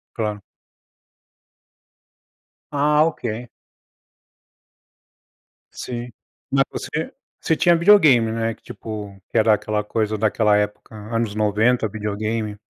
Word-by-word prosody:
Claro. 105 -2 -3 2.3
Ah, 150 +2 +4
ok. 120 -7 -4 2.3
Sim. 120 0 -6 0.4
Mas 135 0 +4
você - - -4 0.3
você 160 - +1
tinha 175 +1 +4
videogame, 155 - +5
né? 115 0 -1
Que - - -21
tipo 105 -3 -8
que - - -2
era 110 0 +5
aquela 105 0 -2
coisa, 110 0 -1
daquela 105 0 +2
época 105 +1 -2
anos 110 0 -3
90, 110 +3 +2
videogame. 105 +1 -3
110 Hz, 100 wpm, -22 LUFS, 105-125 Hz, 2.3 s, videogame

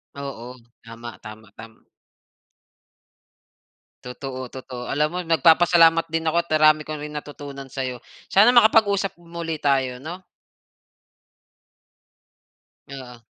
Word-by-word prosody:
Oo, 130 -3 -8 0.3
tama, 115 0 -10
tama, 110 -1 -13
tam 115 0 -14 2.2
Totoo, 130 0 -7
totoo. 130 -1 -8
Alam 150 +2 +1
mo, 180 - -4
nagpapasalamat 165 0 +4
din 165 0 -2
ako 160 +2 +1
at 170 - -27
ang 155 0 +2
rami 155 0 +5
ko 155 - -7
rin 150 0 -8
natutunan 145 -2 -9
sa'yo. 130 -2 -5 0.2
Sana 210 +5 +5
makapag-usap 210 -5 +3
muli 170 -1 -6
tayo, 130 -3 0
'no? 175 +5 -9 2.7
Oo. 125 -3 -10
145 Hz, 110 wpm, -22 LUFS, 125-165 Hz, 2.7 s, rami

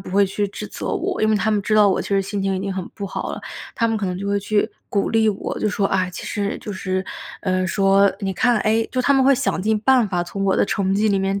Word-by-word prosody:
不 190 - -9
会 200 +1 +4
去 205 +2 -1
指 - - -7
责 - - -7
我， 385 -1 -2
因 215 - +3
为 215 - +3
他 210 +2 0
们 210 -1 +2
知 215 - 0
道 210 -1 +6
我 - - +1
其 - - -8
实 200 -1 +2
心 195 0 -3
情 195 0 0
已 - - -3
经 195 0 -3
很 185 -2 -4
不 200 -2 -5
好 - - -4
了， - - -6 0.3
他 230 -1 +1
们 225 - 0
可 210 - -2
能 180 -1 -2
就 200 - -4
会 200 0 +1
去 205 +1 0 0.2
鼓 200 - 0
励 225 -1 +3
我。 200 - -3
就 - - 0
说： 200 -1 0
“哎” 185 -1 0
其 - - -7
实 200 -2 -2
就 210 - -6
是， 185 0 -2 0.4
呃， 185 -1 0
说： 195 0 +3
“你 195 -1 -2
看” 235 +4 +2
诶， 220 +1 +1
就 255 - +1
他 280 +3 +3
们 265 -1 +4
会 275 0 +6
想 255 -7 -1
尽 215 0 +1
办 255 -2 +4
法 180 -2 0
从 195 +3 -4
我 190 - +2
的 - - +3
成 195 -1 0
绩 215 +2 +2
里 195 - +2
面 195 +1 -1
200 Hz, 315 characters per minute, -21 LUFS, 195-220 Hz, 0.4 s, 道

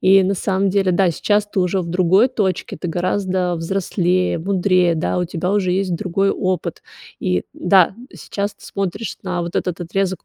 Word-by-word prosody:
И 195 +1 +6
на 190 +2 +1
самом 195 0 0
деле, 195 -1 +2
да, 180 0 +3
сейчас 205 +5 +1
ты 205 -2 -1
уже 180 +1 +1
в 170 - -5
другой 185 +6 +4
точке, 200 -8 -2
ты 175 - -5
гораздо 185 +1 0
взрослее, 180 +1 0
мудрее, 180 -1 +2
да, 165 +2 -1
у 180 - +1
тебя 175 +1 -3
уже 190 -3 +1
есть 185 -1 0
другой 190 +3 0
опыт. 185 -4 -2 0.4
И 90 -1 0
да, 185 0 +3 0.2
сейчас 200 0 -4
ты - - -18
смотришь 200 +3 -4
на 180 -2 -2
вот 170 +1 -4
этот 180 -1 -2
отрезок 190 +2 -2
185 Hz, 180 wpm, -20 LUFS, 175-195 Hz, 0.4 s, И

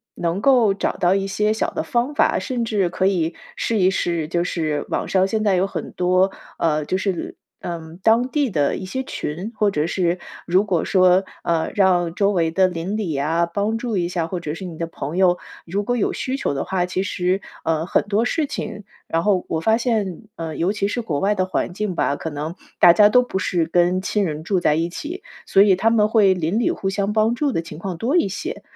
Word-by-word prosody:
能 170 +2 -1
够 245 -6 +4
找 195 - -1
到 180 +2 +3
一 195 0 0
些 210 +2 +1
小 220 - -1
的 - - -2
方 245 +4 -1
法， - - +3
甚 250 -3 -2
至 210 -5 +1
可 190 +2 0
以 170 -4 0 0.2
试 230 - 0
一 185 -1 +4
试， 170 -4 -1
就 170 0 0
是 155 -4 -2
网 - - -1
上 190 -1 +3
现 215 +2 -1
在 200 -3 +3
有 185 +1 +2
很 - - -6
多， 185 +2 +2 0.3
呃， 155 -2 +1
就 185 - 0
是， 190 -2 -3 0.3
嗯， 165 -1 -6
当 230 +3 +4
地 285 -4 0
的 145 -5 +1
一 - - -6
些 230 +8 -3
群， 180 - -5
或 210 -2 +2
者 155 -3 0
是， 175 0 0 0.3
如 185 +3 +3
果 180 -6 0
说， 185 0 +4 0.2
呃 165 -1 0
让 180 -4 +3
周 200 +2 +2
围 165 -4 +1
的 185 +2 +3
邻 180 +3 -3
里 180 -8 -2
啊， 160 +5 +1
帮 205 +6 -1
助 235 -2 -3
一 175 -1 0
下， 170 -2 -2
或 180 +1 -4
者 150 -3 -4
是 175 +4 -7
你 170 -3 -7
的 165 - -2
朋 160 -1 -6
友， 180 -2 +3 0.3
如 190 +4 -2
果 245 +4 0
有 215 - +1
需 260 - -3
求 260 - -1
的 135 - -3
话， 185 -2 0
其 180 +1 -2
实， 185 0 -1 0.2
呃， 160 0 0
很 - - +1
多 210 +2 0
事 305 +5 0
情 220 -6 -5 0.2
然 165 0 0
后 195 -3 +2
我 160 - -1
发 220 +6 +3
现， 220 -7 -1
呃 160 -2 -5
尤 175 +4 +1
其 200 -1 -1
是 240 - -2
国 155 -10 -2
外 200 +2 +2
的 185 -2 +1
环 185 -1 -2
境 200 -1 -3
吧， 140 - +1
可 160 - -4
能 150 +2 -5 0.3
大 175 - +9
家 205 +2 +6
都 250 +3 +5
不 190 -6 -3
是 175 -3 0
跟 175 +2 +2
亲 205 +1 0
人 155 -2 -4
住 185 +2 +1
在 150 -3 +2
一 165 +2 0
起， 330 - -7 0.2
所 195 - +6
以 200 -2 +5
他 220 +4 +3
们 215 -2 +3
会 210 -4 +5
邻 180 +4 -1
里 235 - +2
互 195 - -2
相 200 +2 -1
帮 220 +1 +3
助 280 +3 0
的 165 - 0
情 165 -2 -10
况 185 -1 -5
多 255 - +1
一 335 - +3
些。 310 - -5
185 Hz, 250 characters per minute, -21 LUFS, 170-210 Hz, 0.3 s, 大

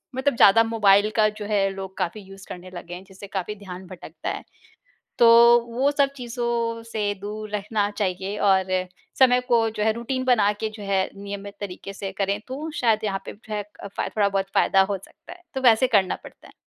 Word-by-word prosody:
मतलब 265 0 +1
ज़्यादा 225 +2 +7
मोबाइल 210 -2 +4
का 215 -1 +4
जो 210 0 -8
है 200 -2 +1
लोग 190 0 -8
काफ़ी 185 +3 -3
यूज़ 195 0 -13
करने 180 0 -8
लगे 175 0 -8
हैं 180 +1 -8
जिससे 195 +1 -11
काफ़ी 195 +1 -4
ध्यान 190 -2 -10
भटकता 180 -1 -7
है। - - -5 0.8
तो 235 - +7 0.4
वो 260 +4 +2
सब 280 -1 +2
चीज़ों 235 -2 -2
से 205 -2 -1
दूर 215 +1 -6
रहना 210 0 -1
चाहिए 195 0 -2
और 190 -1 +3 0.5
समय 250 -1 +6
को 230 -2 +3
जो 215 -1 -3
है 220 - +3
रूटीन 240 +3 -3
बना 220 -5 +4
के 220 - -1
जो 210 - -9
है 195 -1 0
नियमित 200 0 -7
तरीके 195 0 -7
से 195 0 -5
करें 200 +1 0
तो 280 +5 -5
शायद 225 -6 +2
यहाँ 195 -2 -1
पे - - -6
जो 215 +1 -10
है 210 - -1
एक 205 0 -10
अ, - - -7
फा 200 - -4
थोड़ा 205 -2 +1
बहुत 195 -1 0
फ़ायदा 195 - +4
हो 195 +1 0
सकता 255 - -14
है। 360 - -19
तो 265 - -2
वैसे 245 0 +5
करना 200 -6 +2
पड़ता - - -14
है। - - -17
205 Hz, 210 wpm, -24 LUFS, 195-230 Hz, 0.8 s, ज़्यादा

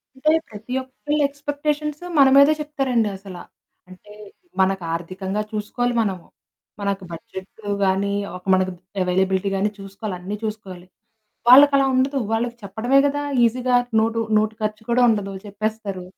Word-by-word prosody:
అంటే 305 +4 +2 0.2
ప్రతి 215 +3 -8
ఒక్కళ్ళ 290 +3 -3
ఎక్స్పెక్టేషన్స్ 290 +2 -3 0.2
మన 275 - +8
మీదే 280 +2 +7
చెప్తారండి 270 -7 0
అసల. 190 -1 -10 0.5
అంటే 185 +3 -15 0.5
మనకు 190 -1 +1
ఆర్థికంగా 190 +4 -3
చూసుకోవాలి 225 +3 -2
మనము. 190 -5 -3 0.6
మనకు 200 -1 -2
బడ్జెట్టు 190 +5 -10 0.2
గానీ, 195 +1 +1 0.2
ఒక 180 - -18
మనకు 185 0 +2 0.3
అవైలబిలిటీ 190 +1 +1
గాని 195 +2 +1
చూసుకోవాలి, 195 +1 -6
అన్నీ 190 +4 -5
చూసుకోవాలి. 195 -5 -6 0.6
వాళ్ళకలా 275 +2 +8
ఉండదు. 265 +2 +1
వాళ్ళకి 235 +1 -1
చెప్పడమే 220 +7 +1
గదా! 290 +1 -1 0.2
ఈజీగా 250 +2 +2 0.2
నోటు 225 +1 0 0.2
నోటు 215 +1 +2
ఖర్చు 215 0 -2
కూడా 245 +1 +3
ఉండదు 205 -3 0
చెప్పేస్తారు. 205 -2 -4
215 Hz, 130 wpm, -22 LUFS, 195-260 Hz, 0.6 s, మన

